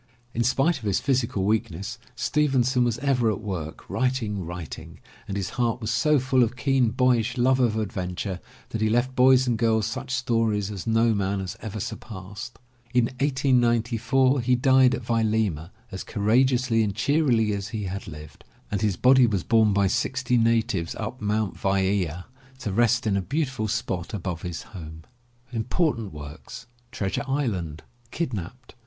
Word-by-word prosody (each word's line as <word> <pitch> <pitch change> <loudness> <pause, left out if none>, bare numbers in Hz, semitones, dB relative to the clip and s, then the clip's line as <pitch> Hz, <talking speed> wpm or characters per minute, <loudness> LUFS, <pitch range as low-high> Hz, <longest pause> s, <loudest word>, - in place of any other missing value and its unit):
In 120 - 0
spite 135 +7 +2
of 110 - -11
his 100 - +1
physical 125 -8 0
weakness, 105 0 -1 0.2
Stevenson 130 -4 +2
was 120 -2 0
ever 125 -4 +1
at 105 - -1
work, 90 -8 -6
writing, 115 -7 -1
writing, 85 -1 -8 0.3
and 100 - -3
his 95 - -3
heart 120 0 +1
was 110 -1 -3
so 150 +6 +3
full 130 0 +2
of 120 +1 +1
keen 130 -2 +2
boyish 125 0 +1
love 130 +2 +3
of 115 -4 +2
adventure 95 -2 -3 0.3
that 110 - -4
he 110 - +2
left 120 +3 +1
boys 130 0 +5
and 120 -3 0
girls 110 -2 +2
such 110 +3 -5
stories 115 -6 0
as 100 -2 -6
no 115 0 +3
man 100 -1 -1
has 95 -1 -5
ever 110 -1 -5
surpassed. 100 +2 -7 0.4
In 125 -2 +5
1894 130 -1 +2
he 125 +1 +2
died 130 0 +4
at 125 - -7
Vailima 110 -8 0 0.2
as 95 - -5
courageously 120 +2 +2
and 100 -3 -1
cheerily 120 -3 +2
as 100 0 -3
he 105 0 -4
had 95 +1 -5
lived, 75 -1 -11 0.3
and 100 -1 -1
his 105 -5 +1
body 130 +1 +6
was 100 -5 -1
borne 110 -3 +4
by 100 0 +2
sixty 125 +6 0
natives 115 -6 +1
up 130 - -5
Mt. 105 -1 0
Vaea 95 -3 0 0.3
to 120 -6 -4
rest 120 +4 +2
in 105 -2 +1
a 100 - +1
beautiful 130 - -2
spot 105 -4 -3
above 90 -4 -4
his 85 -2 -5
home. 80 -3 -9 1.9
Treasure 95 +5 -2
Island. 100 - -2 0.3
Kidnapped. 125 - -5
115 Hz, 160 wpm, -25 LUFS, 100-125 Hz, 1.9 s, body